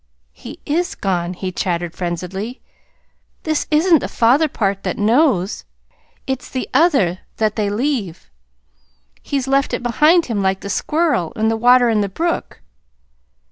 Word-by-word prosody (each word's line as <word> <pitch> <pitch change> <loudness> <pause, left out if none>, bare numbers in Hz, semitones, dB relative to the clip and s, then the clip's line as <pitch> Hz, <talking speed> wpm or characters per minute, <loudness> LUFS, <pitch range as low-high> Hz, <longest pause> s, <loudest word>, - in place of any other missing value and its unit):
He - - -11
is 345 +5 -1
gone," 180 -2 -2
he 185 +1 -4
chattered 175 -2 -2
frenziedly. 185 +7 -5 0.8
"This 310 -1 -1
isn't 320 +2 +4
the - - -4
father 260 +7 +3
part 200 -7 -2
that - - -3
KNOWS. 215 - +2 0.6
It's 265 -1 -4
the 255 - -4
other 260 - +3 0.2
that 215 -1 0
they 210 -2 0
leave. 210 - -3 0.9
He's 275 -2 -3
left 275 +1 +1
it - - -6
behind 305 +8 +3
him 220 -5 -2
like 190 0 0
the 200 - -5
squirrel, 300 - 0
and 220 +1 +1
the - - 0
water 245 +2 +5
in 220 -2 +2
the 200 - -1
brook." 335 - -3
225 Hz, 145 wpm, -19 LUFS, 190-285 Hz, 0.9 s, water